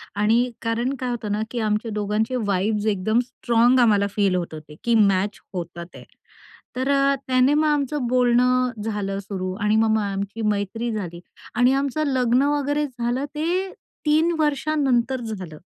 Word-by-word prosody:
आणि 225 +4 +2
कारण 235 +3 -1
काय 255 - -2
होतं 225 -4 -3
ना 210 - 0
की 245 - -3
आमच्या 215 +1 -1
दोघांचे 210 +4 -1
वाइब्स 205 +2 0
एकदम 210 +4 +1
स्ट्राँग 240 +1 +2
आम्हाला 210 -4 +4
फील 200 -3 +2
होत 170 -3 -3
होते 155 -1 -10
की 235 -1 +2
मॅच 200 -1 +2
होतात 170 -1 -5
आहे. - - -11 0.7
तर 260 +2 -1 0.4
त्याने 255 +2 +3
मग 310 +1 +2
आमचं 290 -2 0
बोलणं 250 +1 +3
झालं 205 -3 -3
सुरू 190 -2 -4
आणि 210 +1 +2
मग 220 0 +3
मग 215 - +1
आमची 200 +2 -4
मैत्री 210 +3 -2
झाली 180 -6 -5 0.4
आणि 245 +2 +4
आमचं 280 +2 0
लग्न 250 -2 +2
वगैरे 290 +1 0
झालं, 245 +1 -2
ते 360 +5 -1 0.3
3 315 +3 +3
वर्षांनंतर 275 -4 +1
झालं. 190 -9 -6
235 Hz, 155 wpm, -23 LUFS, 205-260 Hz, 0.7 s, आम्हाला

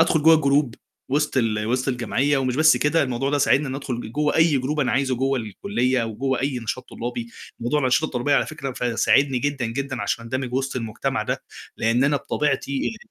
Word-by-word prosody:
أدخل 160 -2 +3
جوّا 160 0 +7
الgroup 140 -3 +2 0.4
وسط 145 +1 0
ال 110 -3 +1
وسط 125 +3 0
الجمعية، 135 +3 +1
ومش 130 -1 -1
بس 155 -4 +6
كده، 150 +6 +2
الموضوع 135 +1 -1
ده 145 - +1
ساعدني 140 +1 +3
إن 130 - -4
أدخل 120 -4 -5
جوّا 150 +1 0
أي 160 -4 +4
group 150 +4 -2
أنا 125 - +1
عايزه 130 -1 +1
جوّا 135 +1 0
الكُليّة، 125 - -1
وجوّا 125 +4 -2
أي 135 -1 -1
نشاط 115 +2 -5
طلّابي. 120 0 -5 0.3
موضوع 120 +6 0
الأنشطة 130 +3 +2
الطُّلابيّة 145 -1 0
على - - +2
فكرة 140 -4 -5
ف 120 -2 -3
ساعدني 135 -2 +3
جدًا 140 -2 -1
جدًا 130 +2 -3
عشان 115 - -2
أندمج 130 +1 -3
وسط 135 0 -1
المجتمع 115 -3 -2
ده، - - -3 0.3
لأن 115 +4 +2
أنا 145 +1 +2
بطبيعتي 140 - -1
135 Hz, 195 wpm, -23 LUFS, 120-145 Hz, 0.4 s, جوّا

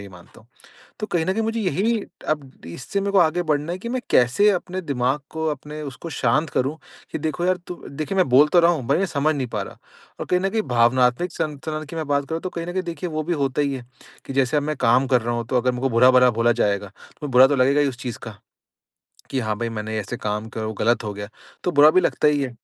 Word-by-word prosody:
ये 100 - -9
मानता 90 +2 -16
हूँ। 110 - -23 0.5
तो 215 - -3
कहीं 170 -5 0
न 190 - +1
कहीं 225 - -1
मुझे 225 +1 -1
यही 205 +3 +1 0.4
अब 145 -4 -2 0.2
इससे 130 - -4
मेरे 200 0 -1
को 200 - +2
आगे 175 +1 +2
बढ़ना 150 0 -1
है 180 - -3
कि 235 - -6
मैं 255 +1 -2
कैसे 130 +13 +4
अपने 185 -1 -2
दिमाग 135 -2 0
को 160 0 -4
अपने 150 +2 -7
उसको 145 +3 -7
शांत 150 +2 +1
करूँ 135 +5 -1 0.3
कि - - -2
देखो 160 +3 -2
यार 185 0 +2
तु 180 - -5
देखिए 155 +6 -4
मैं 185 - +3
बोल 135 +4 +6
तो 175 - +7
रहा 170 0 +5
हूँ 155 -6 -2
मैं 195 - +2
समझ 155 -2 0
नहीं 135 -3 -2
पा 105 - 0
रहा - - -9 0.4
और - - -4
कहीं 180 - +1
न 195 +1 0
कहीं 220 +2 0
भावनात्मक 125 +7 +3
संतुलन 155 -1 -4
की 165 - -7
मैं 160 -2 -3
बात 140 -1 +1
करूँ 165 0 -3
तो 185 - -4
कहीं 170 -1 -5
न - - -3
कहीं 185 0 -1
देखिए 175 +1 -5
वो 155 -1 -3
भी 175 +3 -1
होता 140 -2 0
ही 140 -1 0
है, 130 -2 -7 0.4
कि 135 - -6
जैसे 135 +1 +2
अब 145 - 0
मैं 155 +1 -2
काम 125 +2 +3
कर 125 -1 +3
रहा 120 +1 -2
हूँ 120 0 -3
तो 130 - +1
अगर 125 +1 +2
मेरे 125 0 -5
को 135 - +1
बुरा 125 +2 +5
भरा 125 0 +6
बोला 115 +1 +2
जाएगा 100 -1 0 0.3
तो 150 - -3
बुरा 130 0 +7
तो 145 - +1
लगेगा 135 +3 +3
ही 145 - +2
उस 130 -3 -4
चीज़ 125 -3 -5
का। 110 -3 -9 0.9
कि 135 - -1
हाँ 110 -3 -1
भाई 120 +1 -2
मैंने 110 -1 -4
ऐसे 105 +4 -5
काम 105 0 -3
करा 110 - -6
और - - -2
वो 110 - -4
गलत 120 +2 +2
हो 105 - -3
गया। 100 0 -7 0.4
तो 180 - 0
बुरा 145 0 +7
भी 185 - +4
लगता 160 - +1
ही 145 -1 +2
है। 135 - -2
145 Hz, 275 wpm, -22 LUFS, 125-170 Hz, 0.9 s, तो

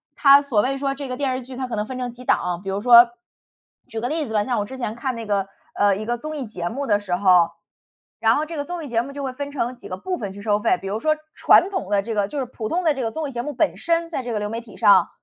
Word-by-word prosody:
它 280 -1 +7
所 260 -7 +1
谓 270 +4 -1
说 275 0 -1
这 275 -1 -6
个 250 - -4
电 270 -3 0
视 255 - -5
剧 255 +1 -9
它 260 -1 -3
可 240 - -4
能 210 0 -1
分 255 +2 -6
成 245 -1 -4
几 245 +1 -12
档 - - +3
啊， 175 0 -3
比 195 - -5
如 195 +1 -1
说， 240 +1 +8 0.8
举 225 - -5
个 240 - -2
例 310 0 -1
子 220 - -7
吧， 210 -1 +2
像 245 -2 -1
我 205 - -1
之 265 +5 -9
前 225 -4 -3
看 255 +2 -2
那 230 -1 -6
个， 200 -2 0 0.3
呃， 205 -1 +3
一 215 - -5
个 240 +1 -1
综 310 +5 -6
艺 275 - -4
节 175 -5 -4
目 275 +4 -4
的 205 -2 +3
时 185 -3 -1
候， 180 -3 +4 0.7
然 225 0 +4
后 300 - 0
这 330 +1 -7
个 285 - -1
综 350 0 -5
艺 - - -6
节 230 -3 +1
目 275 - -8
就 280 0 -6
会 265 - -2
分 285 +2 -5
成 255 -3 -2
几 245 - -12
个 185 - -3
部 365 - -3
分 205 -3 -5
去 200 - -10
收 205 -1 +1
费， 205 - +2
比 195 - -6
如 205 +3 -2
说 310 0 +2 0.2
传 360 - +5
统 380 -2 -4
的 200 -1 +3
这 225 +3 -4
个 205 -1 +1
就 290 - -4
是 265 - -1
普 235 -3 -6
通 360 +2 0
的 315 - +4
这 270 - -3
个 225 - -1
综 315 +2 -3
艺 - - -8
节 240 - -2
目 295 - -4
本 295 +4 +1
身 335 0 0
在 295 -6 -3
这 245 - -4
个 215 - -1
流 210 0 -3
媒 225 +2 -3
体 225 -4 -15
上 190 -3 +5
240 Hz, 350 characters per minute, -22 LUFS, 210-280 Hz, 0.8 s, 说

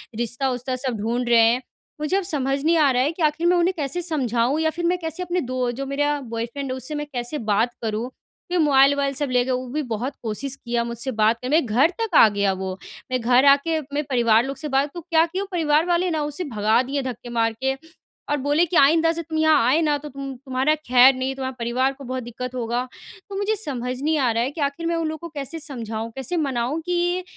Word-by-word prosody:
रिश्ता-वुश्ता 250 +2 -2
सब 255 -2 -2
ढूँढ 240 +2 -1
रहे 235 -1 +6
हैं। 250 +2 +1 0.4
मुझे 330 +6 +1
अब 395 - -1
समझ 275 -5 -1
नहीं 330 +2 +3
आ 300 -3 +5
रहा 250 0 +2
है 295 - +1
कि 335 - -9
आखिर 305 +3 +1
मैं 355 0 +4
उन्हें 350 +2 +2
कैसे 295 +3 -2
समझाऊँ 265 -5 0
या 315 - +2
फिर 345 +2 -4
मैं 360 +1 +2
कैसे 325 +2 -4
अपने 355 0 -1
दो 255 -1 -2
जो 275 +3 -5
मेरा 290 +1 0
बॉयफ्रेंड 240 +3 -5
है, 260 - -3
उससे 260 +4 -5
मैं 295 0 -3
कैसे 245 +4 -3
बात 220 +1 0
करूँ? 220 +2 -2 0.4
क्योंकि 355 -2 +2
मोबाइल-वोबाइल 280 0 +4
सब 280 0 -1
ले 250 -1 +3
गए। 260 - -1
वो 255 0 -2
भी 300 +4 -2
बहुत 235 +5 -2
कोशिश 255 +5 -2
किया 235 -2 -2
मुझसे 235 +3 -4
बात 220 +2 +3
कर 255 - -4
मेरे 310 0 +3
घर 245 +8 +3
तक 440 -7 -2
आ 225 - +9
गया 200 -1 +1
वो। 190 0 -4 0.4
मेरे 255 - +1
घर 250 +3 +4
आके 285 +3 +4
मेरे 285 +1 -3
परिवार 235 -3 +4
लोग 275 +1 -4
से 305 - -5
बात 275 +1 +1
तो 345 - -6
क्या 325 0 +3
किये 370 +3 -4
वो, 400 - -5
परिवार 315 -2 +2
वाले 355 +1 +1
ना 315 - -1
उसे 295 +4 -4
भगा 220 -3 +1
दिए 275 +2 -2
धक्के 245 -1 -6
मार 230 -1 +1
के 265 0 +2 0.6
और 295 - +1
बोले 290 +5 +2
कि 345 - -5
आइंदा 325 +4 +5
से 335 - -3
तुम 320 -1 -5
यहाँ 310 -6 +4
आए 305 +6 +3
ना, 300 -2 +2
तो 295 +1 -9
तुम 275 0 -6
तुम्हारा 265 +3 +1
ख़ैर 255 -3 +5
नहीं, 260 +1 -2
तुम्हारे 260 -1 -4
परिवार 250 +3 0
को 275 - -12
बहुत 255 -1 -4
दिक्कत 250 +2 -6
होगा। 240 +1 -2 0.4
तो 395 - -6
मुझे 415 +2 0
समझ 255 - -4
नहीं 310 +2 +1
आ 255 -4 +2
रहा 230 +1 +1
है 265 - -2
कि 300 0 -6
आखिर 285 +4 -2
मैं 335 - 0
उन 330 -1 -1
लोगों 315 +2 -5
को - - -14
कैसे 280 +4 -5
समझाऊँ? 230 -7 -5
कैसे 270 +6 -3
मनाऊँ 270 0 -1
कि 355 +1 0
275 Hz, 245 wpm, -23 LUFS, 245-315 Hz, 0.6 s, आ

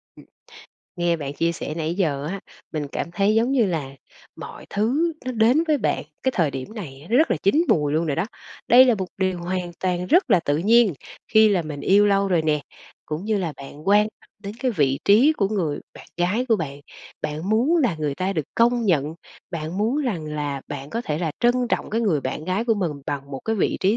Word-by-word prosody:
Ừm, - - -16 0.7
nghe 175 -1 +1
bạn 140 -3 -5
chia 165 +3 0
sẻ 155 -2 -5
nãy 165 0 -2
giờ 150 -7 -1
á, 195 - -5 0.3
mình 150 -2 -2
cảm 170 - -3
thấy 200 +4 +2
giống 230 +4 +2
như 240 -6 +3
là 160 -7 -2 0.5
mọi - - -9
thứ 270 +12 +1
nó 255 - -1
đến 240 +7 +3
với 300 - +3
bạn - - -1 0.2
cái 260 - +1
thời 165 -5 +2
điểm 135 - -7
này 150 -7 -8
nó 240 - +4
rất 320 - +3
là - - +2
chín 260 - +3
mùi 150 -2 +2
luôn 160 +2 +1
rồi 145 - -1
đó. 170 - +1 0.4
Đây 250 +2 +8
là 250 -2 +4
một 190 -3 -3
điều 185 -1 0
hoàn 180 0 -3
toàn 180 -1 -1
rất 340 - +3
là 185 - +5
tự 145 -2 0
nhiên 215 +3 +4 0.4
khi 220 0 +7
là 190 -4 +2
mình 150 -2 -6
yêu 205 +2 +4
lâu 200 0 +2
rồi 175 -4 +2
nè, 150 -1 +1 0.5
cũng 155 +5 -4
như 215 -1 0
là 170 -5 -2
bạn 145 +5 -9
quan 205 +1 +6 0.2
tâm - - -24
đến 200 +2 -6
cái 260 - +1
vị 140 - +1
trí 230 +10 +6
của 200 -10 0
người 170 -9 -1
bạn - - -13
gái 205 +9 0
của 225 - +4
bạn. 145 -4 -5 0.4
Bạn 155 +4 -3
muốn 250 +10 +3
là 255 - +2
người 150 -3 -2
ta 185 +5 -1
được 155 -6 -2
công 235 0 +3
nhận, 155 -3 +1 0.4
bạn 165 +1 -4
muốn 225 +6 +1
rằng 210 - -2
là 145 -2 -3
bạn 140 0 -6
có 230 - -2
thể 155 -9 -3
là 165 -3 -1
trân 240 0 +4
trọng - - -1
cái 225 - 0
người 190 -10 +1
bạn 135 +3 -4
gái 185 +6 -1
của 230 -2 +2
mình 185 -5 -1 0.2
bằng 140 -1 -4
một 135 - -5
cái 225 0 0
vị - - +1
trí 200 +4 +3
185 Hz, 235 wpm, -23 LUFS, 155-220 Hz, 0.7 s, Đây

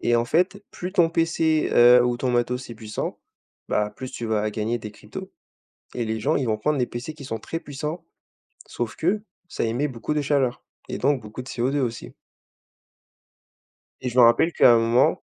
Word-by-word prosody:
et 120 - +2
en 115 - +2
fait, 185 +9 +1
plus 180 +1 -6
ton 175 -4 +4
PC, 165 -1 +1
heu, 120 +1 +7
ou 120 0 +1
ton 125 +1 -1
matos 125 +1 -1
est - - -7
puissant, 110 0 -5 0.5
bah, 105 0 0
plus 130 -1 -6
tu 120 - -5
vas 110 -1 0
gagner 110 +3 -2
des 105 -1 -7
cryptos 105 - -9 0.6
et 120 - -2
les 110 0 -2
gens 150 +8 +1
ils 130 - -1
vont 110 -1 +1
prendre 150 +5 0
les 125 - +1
PC 120 +7 -6
qui 145 -3 -11
sont 115 -4 -4
très 165 - -5
puissants, 150 +2 -5 0.6
sauf 120 -2 -4
que 200 +6 0 0.3
ça - - -4
émet 120 +6 0
beaucoup 125 +3 -4
de 150 - 0
chaleur 135 -4 0 0.3
et - - -4
donc 140 -1 +2
beaucoup 110 +4 -8
de 130 - -12
CO2, 130 +4 -1
aussi 120 -4 -4 1.9
et 130 - -3
je 125 +1 -3
m'en 125 - +9
rappelle 120 +9 +4
qu'à 125 - +6
un 115 - +5
moment 115 +3 +3
125 Hz, 200 wpm, -24 LUFS, 115-150 Hz, 1.9 s, m'en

